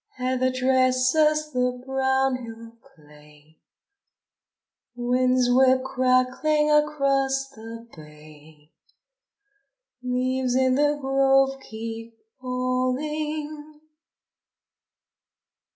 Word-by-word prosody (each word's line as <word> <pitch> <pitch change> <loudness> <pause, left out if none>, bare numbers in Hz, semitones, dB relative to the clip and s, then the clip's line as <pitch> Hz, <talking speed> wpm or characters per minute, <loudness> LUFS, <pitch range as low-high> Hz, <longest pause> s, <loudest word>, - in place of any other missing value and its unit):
Heather 255 0 0
dresses 260 +4 +2
the 250 0 -1
brown 265 0 0
hill 230 0 -10
clay, 150 0 -21 1.4
Winds 250 +1 +1
whip 260 0 +4
crackling 260 +4 +1
across 275 -3 +1
the 230 -2 -11
bay, 150 0 -16 1.3
Leaves 255 0 -1
in 260 0 +2
the 295 +2 +1
grove 270 0 +3
keep 225 0 -8 0.2
falling. 295 +4 -3
255 Hz, 70 wpm, -24 LUFS, 240-270 Hz, 1.4 s, whip